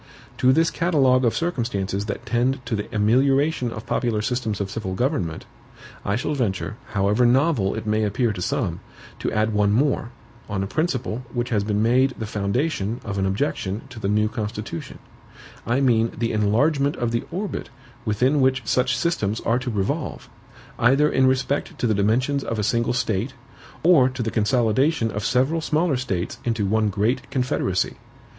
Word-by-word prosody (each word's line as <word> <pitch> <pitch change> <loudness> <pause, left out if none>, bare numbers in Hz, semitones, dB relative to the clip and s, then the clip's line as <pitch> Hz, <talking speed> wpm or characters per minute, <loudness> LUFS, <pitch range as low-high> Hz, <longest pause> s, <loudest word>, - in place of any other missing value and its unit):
To 130 - +5
this 165 +4 +3
catalogue 135 -7 +3
of 115 - +2
circumstances 110 - -2
that 105 - -5
tend 125 +2 0
to 115 - -1
the 105 - -3
amelioration 130 +5 +2
of 110 0 -7
popular 110 -4 0
systems 115 -4 -2
of 100 -1 -3
civil 95 -5 -4
government, 105 - -1 0.6
I 100 - 0
shall 135 +6 -1
venture, 115 -5 -2 0.2
however 100 +4 +2
novel 125 -4 +3
it - - -5
may 110 0 +1
appear 110 +2 0
to 90 - -6
some, 115 - -1 0.4
to - - -2
add 110 +1 +1
one 105 -1 +3
more, 125 +1 +1 0.4
on 95 -2 -1
a - - -1
principle 130 - -1
which 120 0 -2
has 105 -4 +1
been 105 0 0
made 130 +3 +3
the 110 - -4
foundation 105 +2 -1
of 100 -2 -3
an 95 - +1
objection 100 -1 -2
to 120 -3 -9
the 100 - -2
new 105 +1 +2
Constitution; 105 -4 -5 0.7
I 120 +4 +2
mean 115 -3 +3
the 115 0 0
ENLARGEMENT 140 +8 +2
of 120 -1 -1
the 115 - -1
ORBIT 195 +4 -4 0.3
within 125 +6 +2
which 130 -1 +2
such 130 +3 +1
systems 115 - 0
are 115 +2 +1
to 125 0 -4
revolve, 100 -4 -2 0.5
either 135 +5 +4
in 130 0 +4
respect 130 +2 0
to - - -1
the 110 - +3
dimensions 125 +8 +1
of 115 - -3
a 105 - -1
single 115 +3 +1
State 110 -5 -1 0.5
or 155 -7 +6
to 130 -2 -4
the 115 - -2
consolidation 120 +3 +2
of 105 - -4
several 135 +6 +1
smaller 155 0 +1
States 95 -9 -3
into 115 -3 0
one 110 +1 +2
great 110 +7 -1
Confederacy. 125 -8 -1
115 Hz, 175 wpm, -23 LUFS, 105-130 Hz, 0.7 s, or